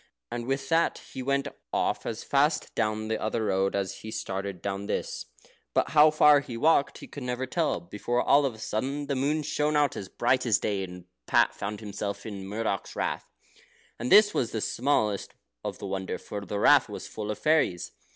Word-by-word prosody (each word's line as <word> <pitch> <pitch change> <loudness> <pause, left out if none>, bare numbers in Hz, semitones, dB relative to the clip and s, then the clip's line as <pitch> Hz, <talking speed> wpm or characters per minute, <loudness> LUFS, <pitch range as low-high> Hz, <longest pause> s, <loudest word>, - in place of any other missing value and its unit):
And 120 0 -4
with 135 0 -1
that 165 +1 +2 0.2
he 130 - -4
went 140 +2 0 0.2
off - - 0
as 115 -1 -4
fast 145 +2 +1
down 110 -1 -1
the 110 - -2
other 110 +1 -1
road 95 -1 +1
as 100 0 -2
he 110 +2 -9
started 95 -3 -4
down 100 +2 -4
this. - - -3 0.5
But - - +2
how 150 +1 +7
far 150 -1 +6
he 125 -4 -7
walked 145 +2 +3
he - - -11
never 125 -1 -2
could 130 - -20
tell, 165 -3 +1
before 105 +7 -2
all 145 +1 +5
of 135 -5 -1
a - - -14
sudden 135 +7 -2
the 140 -1 -1
moon 145 +4 0
shone 150 +1 0
out 145 -2 +2
as 95 - -6
bright 130 +2 +1
as 110 - +4
day, 100 -2 -1
and 90 -1 -9 0.2
Pat - - +4
found 105 +1 -5
himself 100 -1 -5
in 100 -3 -6
Murdoch's 105 -1 -3
Rath. - - -2 0.7
And 120 +2 -3
this 210 0 +8
was 120 - 0
the 110 - -2
smallest 110 -7 0
part - - -9
of - - -16
the - - -7
wonder; 95 -1 -3
for 100 -1 -7
the 100 - -3
Rath - - +5
was - - -7
full 105 -1 -6
of 105 - -2
fairies. 120 - +1
115 Hz, 205 wpm, -28 LUFS, 100-140 Hz, 0.7 s, this